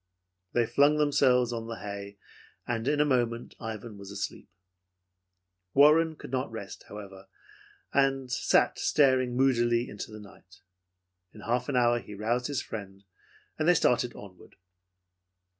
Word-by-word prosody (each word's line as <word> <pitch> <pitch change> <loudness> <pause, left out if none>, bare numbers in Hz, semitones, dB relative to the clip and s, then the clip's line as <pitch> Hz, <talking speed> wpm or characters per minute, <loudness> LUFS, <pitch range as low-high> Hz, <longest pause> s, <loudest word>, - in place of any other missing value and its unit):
They 120 -1 +3
flung 145 +5 +3
themselves 130 -5 +3
on 115 -1 -5
the 115 - -5
hay, 100 -1 -7 0.5
and 115 0 -2
in 145 0 +1
a 150 - +4
moment 120 -4 0
Ivan 110 -1 -7
was 100 -1 -10
asleep. 100 0 -6 1.3
Warren 155 +3 +5
could - - -11
not 130 -2 -2
rest, 100 -3 -8
however, 100 -2 -10 0.7
and 135 -2 +1
sat - - +2
staring 130 -4 +2
moodily 120 -2 +2
into 105 +2 -8
the 105 - -9
night. 95 -3 -17 0.7
In 105 - -11
half 120 +4 -1
an 140 - -1
hour 120 -1 +3
he 105 - -10
roused 120 +4 -1
his 145 -4 -2
friend, 100 -2 -8 0.6
and 155 - +1
they 175 - +6
started 125 -4 +2
onward. 95 -3 -13
120 Hz, 140 wpm, -28 LUFS, 105-135 Hz, 1.3 s, they